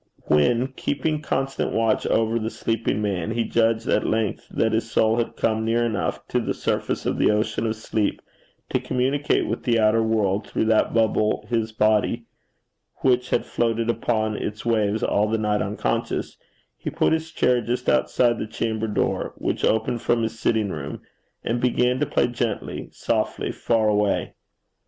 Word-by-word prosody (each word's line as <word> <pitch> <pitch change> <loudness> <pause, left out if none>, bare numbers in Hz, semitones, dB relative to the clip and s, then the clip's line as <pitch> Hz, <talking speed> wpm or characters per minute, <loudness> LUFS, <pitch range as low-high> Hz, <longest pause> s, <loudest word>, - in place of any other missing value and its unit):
When, 115 - +3
keeping 150 +3 -2
constant 135 -2 -1
watch 115 -1 +1
over 115 +1 +1
the 110 0 -2
sleeping 115 -2 -1
man, 95 -3 -1
he 115 +1 0
judged 115 0 +1
at - - +2
length 110 -1 -1
that 110 - +1
his 110 +1 -1
soul 110 0 +2
had 120 - -1
come 110 0 0
near 115 +1 +1
enough 105 -6 -2
to - - +1
the - - -2
surface - - -2
of - - -1
the - - +4
ocean 110 +1 0
of 110 - -1
sleep 110 -1 -1 0.5
to - - +2
communicate 135 +3 0
with - - -3
the 120 -3 +2
outer 110 +1 +4
world 105 -3 0
through - - -1
that 110 0 +3
bubble 110 -2 +1
his 115 -2 0
body, 110 -1 +1 0.8
which 125 -1 +2
had - - +1
floated 115 0 0
upon 110 -2 -1
its 105 +2 -5
waves 110 -2 +1
all 105 +1 +2
the 115 - +1
night 105 -1 0
unconscious, - - -2 0.4
he - - -5
put - - +1
his 160 0 -1
chair 125 -6 +2
just 125 +2 -3
outside 120 -2 +2
the - - -3
chamber 110 0 -2
door, 105 - -1
which - - -2
opened 110 +2 +1
from 120 -1 +1
his 115 0 -3
sitting 110 -4 +1
room, 70 -4 -5 0.4
and 120 +1 -1
began 125 0 +2
to 150 - +1
play - - +2
gently, 120 -3 -3
softly, - - -1
far 115 -2 +1
away. 105 -1 +1
115 Hz, 170 wpm, -23 LUFS, 110-120 Hz, 0.8 s, the